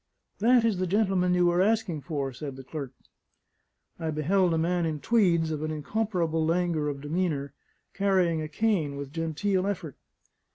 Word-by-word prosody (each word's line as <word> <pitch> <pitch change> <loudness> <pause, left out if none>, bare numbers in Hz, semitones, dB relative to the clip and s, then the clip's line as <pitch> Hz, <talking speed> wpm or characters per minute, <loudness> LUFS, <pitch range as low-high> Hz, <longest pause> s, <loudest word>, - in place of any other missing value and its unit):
"That 235 +2 +4
is 215 -5 +1
the 185 - 0
gentleman 190 -2 +2
you 180 0 +3
were 175 +1 +3
asking 200 -6 +1
for," 140 -4 -3
said 140 +1 -6
the 135 - -10
clerk. 140 -1 -6 1.1
I 160 - -2
beheld 175 +5 +2
a 165 - +1
man 175 +2 +1
in 155 -2 -3
tweeds, 170 -6 +2
of 150 -1 -3
an 155 - -2
incomparable 165 0 -1
languor 165 -2 +1
of 140 -1 -4
demeanour, 155 -1 -1
and 140 -1 -19
carrying 185 -5 +2
a 155 - -3
cane 160 -4 0
with 140 0 -7
genteel 185 +4 -1
effort. 170 -8 -4
170 Hz, 170 wpm, -27 LUFS, 150-190 Hz, 1.1 s, That